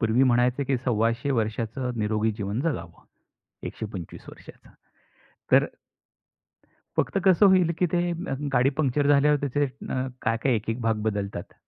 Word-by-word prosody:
पूर्वी 115 Hz, +3 st, +3 dB
म्हणायचे, 125 Hz, +1 st, +2 dB
की 135 Hz, 0 st, 0 dB
125 115 Hz, +3 st, 0 dB
वर्षाचं 115 Hz, +1 st, -2 dB
निरोगी 110 Hz, +1 st, 0 dB
जीवन 100 Hz, +3 st, -3 dB
जगावं. 85 Hz, -, -4 dB, 0.6 s
125 100 Hz, -6 st, -7 dB
वर्षाचं -, -, -15 dB, 0.8 s
तर -, -, +6 dB, 1.3 s
फक्त -, -, +1 dB
कसं 190 Hz, +2 st, +6 dB
होईल, 185 Hz, -3 st, +4 dB
की 180 Hz, -, +3 dB
ते, 175 Hz, 0 st, +1 dB
अ, 170 Hz, -4 st, -3 dB, 0.2 s
गाडी 125 Hz, +2 st, +3 dB
पंक्चर 140 Hz, 0 st, +1 dB
झाल्यावर 145 Hz, +1 st, +4 dB
त्याचे, 145 Hz, +2 st, 0 dB
अ, 130 Hz, -1 st, -4 dB, 0.2 s
काय-काय, 115 Hz, +3 st, +1 dB
एक-एक 115 Hz, +3 st, -3 dB
भाग 115 Hz, -1 st, +1 dB
बदलतात. 100 Hz, -1 st, -4 dB
125 Hz, 135 wpm, -25 LUFS, 110-140 Hz, 1.3 s, तर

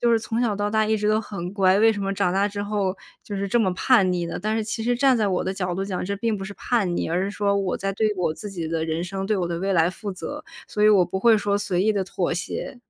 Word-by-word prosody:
就 240 Hz, -, +3 dB
是 225 Hz, -, +4 dB
从 230 Hz, +1 st, -2 dB
小 225 Hz, -4 st, +1 dB
到 205 Hz, +1 st, -1 dB
大 220 Hz, 0 st, +2 dB
一 220 Hz, 0 st, +2 dB
直 210 Hz, 0 st, 0 dB
都 215 Hz, +1 st, +3 dB
很 190 Hz, -4 st, -6 dB
乖， 190 Hz, -1 st, +3 dB
为 225 Hz, 0 st, +6 dB
什 205 Hz, -, -5 dB
么 195 Hz, 0 st, -1 dB
长 180 Hz, -1 st, +1 dB
大 195 Hz, +1 st, +2 dB
之 205 Hz, 0 st, -4 dB
后， 200 Hz, -2 st, -1 dB, 0.3 s
就 205 Hz, -, -6 dB
是 200 Hz, 0 st, -2 dB
这 240 Hz, -, +2 dB
么 190 Hz, -5 st, +1 dB
叛 195 Hz, -5 st, +3 dB
逆 175 Hz, -1 st, -1 dB
呢？ 170 Hz, -, -4 dB
但 215 Hz, +2 st, -1 dB
是 220 Hz, -, 0 dB
其 220 Hz, +1 st, -4 dB
实 245 Hz, -, +2 dB
站 260 Hz, +1 st, +4 dB
在 210 Hz, -, +2 dB
我 185 Hz, -2 st, 0 dB
的 190 Hz, -, -2 dB
角 180 Hz, -2 st, -2 dB
度 195 Hz, +1 st, -2 dB
讲， 185 Hz, -2 st, -3 dB
这 200 Hz, -, -2 dB
并 220 Hz, +1 st, -1 dB
不 195 Hz, -, -5 dB
是 200 Hz, +1 st, -7 dB
叛 200 Hz, -8 st, 0 dB
逆， -, -, -1 dB
而 175 Hz, +2 st, +1 dB
是 200 Hz, -, -2 dB
说 200 Hz, -1 st, +1 dB
我 195 Hz, -2 st, -1 dB
在 195 Hz, 0 st, -2 dB
对 220 Hz, +2 st, +1 dB
我 175 Hz, -3 st, 0 dB
自 210 Hz, +6 st, -8 dB
己 170 Hz, -5 st, -5 dB
的 160 Hz, -1 st, -1 dB
人 160 Hz, +1 st, -2 dB
生， 195 Hz, +1 st, -4 dB
对 215 Hz, -, +1 dB
我 175 Hz, -2 st, -1 dB
的 170 Hz, -, -2 dB
未 195 Hz, +2 st, -1 dB
来 170 Hz, -1 st, +3 dB
负 200 Hz, +1 st, -6 dB
责， 185 Hz, -, -7 dB, 0.2 s
所 210 Hz, 0 st, 0 dB
以 -, -, +7 dB
我 195 Hz, -4 st, +6 dB
不 185 Hz, +2 st, -3 dB
会 230 Hz, +2 st, +5 dB
说 205 Hz, -1 st, 0 dB
随 190 Hz, -3 st, 0 dB
意 215 Hz, +1 st, +3 dB
地 195 Hz, -2 st, -1 dB
妥 180 Hz, -2 st, -2 dB
协。 180 Hz, +8 st, -4 dB
200 Hz, 335 characters per minute, -24 LUFS, 185-215 Hz, 0.3 s, 以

